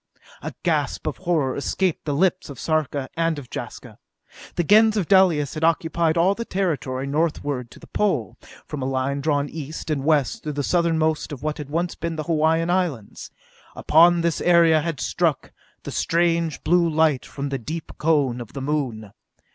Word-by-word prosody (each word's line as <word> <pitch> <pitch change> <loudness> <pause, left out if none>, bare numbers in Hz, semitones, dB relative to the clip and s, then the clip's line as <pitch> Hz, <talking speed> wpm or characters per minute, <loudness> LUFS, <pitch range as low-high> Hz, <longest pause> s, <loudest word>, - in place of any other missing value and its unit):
A - - -6
gasp - - -1
of - - -3
horror 165 -8 0
escaped 180 +4 -1
the 145 -2 -1
lips 185 +2 +1
of 135 -4 -9
Sarka 145 -1 -1
and 165 -1 0
of 135 -4 -9
Jaska. - - -8 0.6
The 175 - +1
Gens 215 +5 +5
of 185 -6 0
Dalis 175 -8 +4
had 155 0 -5
occupied 165 0 +1
all 180 +4 +4
the 230 - -5
territory 150 - -2
northward 145 -4 -1
to - - -15
the - - -13
Pole, 150 - -1 0.3
from 150 - -6
a 130 - -2
line 135 +1 -1
drawn 145 -1 0
east 155 +1 -6
and 140 -3 -1
west 150 -3 +1
through 150 - -4
the 145 0 -2
southernmost 160 -2 +1
of 140 -2 -8
what 155 0 -2
had 145 -2 -7
once 170 +3 -1
been 170 0 -4
the 155 - -3
Hawaiian 160 +1 +1
Islands. 170 - -2 0.5
Upon 170 +2 +5
this 170 -1 0
area 170 -3 +5
had 160 -4 -3
struck 140 +6 -1 0.3
the - - -6
strange 170 -1 0
blue 170 +1 +3
light 155 -4 +2
from 140 0 -5
the 135 -1 -3
deep 155 +7 -6
Cone 145 -6 +1
of 115 - -10
the 135 - -5
Moon. 130 -8 -2
155 Hz, 180 wpm, -23 LUFS, 140-170 Hz, 0.6 s, Gens